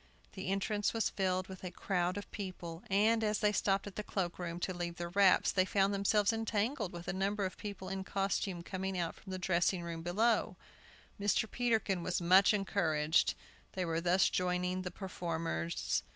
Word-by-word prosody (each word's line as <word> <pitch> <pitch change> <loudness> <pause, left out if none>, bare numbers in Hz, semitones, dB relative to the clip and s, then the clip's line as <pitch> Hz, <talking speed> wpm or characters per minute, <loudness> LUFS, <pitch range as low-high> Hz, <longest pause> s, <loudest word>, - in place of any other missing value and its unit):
The 190 -2 -6
entrance 200 +2 0
was 225 - +1
filled 185 -1 0
with 190 -1 -10
a 180 - -3
crowd 180 0 -1
of 205 - -7
people, 180 -4 -6
and, 220 +3 +3
as 210 -1 +1
they 210 0 +2
stopped 195 -1 +1
at 205 - -9
the - - -1
cloakroom, 175 -3 -3
to 185 - -1
leave 175 -1 -4
their 175 0 -4
wraps, 195 +1 +4
they 185 - +3
found 195 +1 +2
themselves 200 +2 +2
entangled 225 - -1
with 175 0 -8
a - - -1
number 200 +1 0
of 185 - -4
people 200 -2 -7
in 190 0 -3
costume 195 -2 -1
coming 190 +1 -3
out 170 -2 -1
from 190 - -12
a 185 - -3
dressing 180 0 +1
room 165 -1 -5
below. 215 +7 +1 0.6
Mr. 205 +2 +2
Peterkin 220 -6 0
was 175 +1 -1
much 185 +3 +6
encouraged. 160 -6 +2 0.4
They 185 -1 -1
were 165 0 -1
thus 180 +2 +4
joining 180 0 0
the 185 - -4
performers. 165 - -2
190 Hz, 180 wpm, -34 LUFS, 175-200 Hz, 0.6 s, much